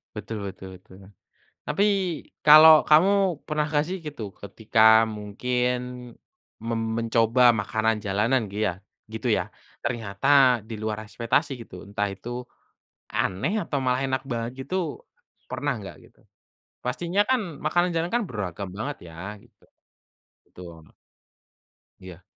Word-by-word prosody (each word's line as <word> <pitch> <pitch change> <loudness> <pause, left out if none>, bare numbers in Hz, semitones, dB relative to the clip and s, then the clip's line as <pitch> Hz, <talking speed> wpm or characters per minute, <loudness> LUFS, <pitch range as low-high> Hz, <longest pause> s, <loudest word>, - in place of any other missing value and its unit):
Betul 105 +1 -6
betul 95 0 -9
betul. 95 0 -17 0.7
Tapi 155 +7 +2 0.6
kalau 155 +1 +9
kamu 185 +1 +4
pernah 150 0 0
gak 150 0 +1
sih 185 +2 -3
gitu 145 -10 -7
ketika 110 +2 +3
mungkin, 120 +4 -2 0.9
mem 115 0 -2 0.2
mencoba 115 +2 +4
makanan 110 +1 0
jalanan 105 +4 0
giya 100 -3 -2 0.3
gitu 110 0 -4
ya - - +1 0.4
ternyata 125 +3 +3
di 115 - -7
luar 110 0 -3
ekspektasi 120 +7 -1
gitu 90 -5 -12
entah 105 0 -2
itu, 120 +5 -6 0.7
aneh 95 - -1
atau 150 - -3
malah 125 +1 +1
enak 130 -1 -2
banget 115 0 -2
gitu, 185 - -3 0.5
pernah - - -1
nggak - - -9
gitu? - - -32 0.7
Pastinya 175 +3 -1
kan 260 -1 +3 0.2
makanan 175 +1 +2
jalanan 165 +1 -1
kan 240 - 0
beragam 100 - -5
banget 135 +7 -4 0.2
ya 95 +6 -7
gitu, - - -27 0.8
betul. 85 -3 -13 1.1
Iya. 95 -1 -12
115 Hz, 125 wpm, -25 LUFS, 105-150 Hz, 1.1 s, kalau